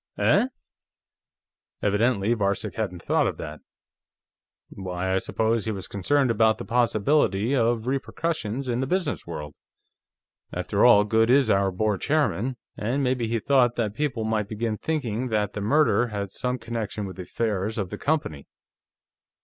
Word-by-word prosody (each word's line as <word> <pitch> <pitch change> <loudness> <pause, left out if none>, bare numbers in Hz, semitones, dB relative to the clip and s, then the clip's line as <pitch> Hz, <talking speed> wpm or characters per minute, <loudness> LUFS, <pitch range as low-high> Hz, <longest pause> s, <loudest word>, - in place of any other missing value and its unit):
"Eh?" 250 - +3 1.4
Evidently 105 +1 +2
Varcek 100 -3 -1
hadn't 95 -6 -4
thought - - +2
of - - -3
that. 75 0 -7 1.1
"Why, 95 -1 -3
I 95 - +3
suppose 110 +2 0
he 110 - -1
was 95 -3 -5
concerned 130 +6 +1
about 110 0 +3
the - - -7
possibility 120 0 +2
of 115 -2 +1
repercussions 135 -2 -2
in 120 -1 0
the 130 - -1
business 180 - -1
world. 75 -3 -6 1.0
After - - 0
all, 105 - +7
Goode 110 +2 +2
is 130 -3 +4
our 100 0 +3
board 105 +2 -1
chairman, 135 -5 0 0.2
and 125 +7 -1
maybe 125 -3 0
he 115 +1 0
thought 120 0 +3
that 110 -4 -1
people 135 -4 -2
might 110 -2 0
begin 110 0 -2
thinking 130 -6 -2
that 105 -3 0
the 105 - -4
murder 120 0 +3
had 100 -3 -4
some 125 +4 -2
connection 115 -3 -4
with 95 -2 -8
the - - -5
affairs 105 +2 -2
of 95 -4 -3
the - - -4
company." 140 - -1
110 Hz, 155 wpm, -25 LUFS, 100-125 Hz, 1.4 s, all